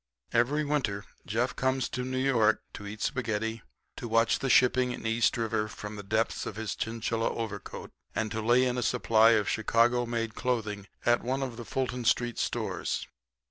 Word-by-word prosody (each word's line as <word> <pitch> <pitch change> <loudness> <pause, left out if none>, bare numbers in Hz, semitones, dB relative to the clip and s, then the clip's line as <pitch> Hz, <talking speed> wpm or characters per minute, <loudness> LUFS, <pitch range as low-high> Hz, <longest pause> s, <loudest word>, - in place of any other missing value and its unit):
Every 135 +6 +2
winter 115 -9 -1 0.2
Jeff 120 +4 0
comes 130 -1 +1
to 125 - -3
New 130 +1 -3
York 125 -5 +3
to 100 - -8
eat 105 +1 -6
spaghetti, 110 -3 -1 0.4
to - - -5
watch 115 0 +3
the 135 - -1
shipping 125 0 +4
in - - -8
East 115 +1 +2
River 110 -2 0
from 105 0 -7
the 105 - -6
depths 110 +3 -1
of - - -5
his 110 -2 -3
chinchilla 115 0 -1
overcoat, 110 -3 -6 0.2
and 110 -1 -1
to 110 0 -2
lay 120 +3 +4
in 125 0 0
a - - -1
supply 115 -2 +4
of 105 -3 +2
Chicago 115 +2 +2
made 115 -1 -2
clothing 110 -6 -2 0.2
at 120 0 +4
one 130 +3 -1
of 125 -3 -4
the 120 0 -8
Fulton 130 -1 -2
street 120 0 +1
stores. - - -2
115 Hz, 180 wpm, -29 LUFS, 110-125 Hz, 0.4 s, shipping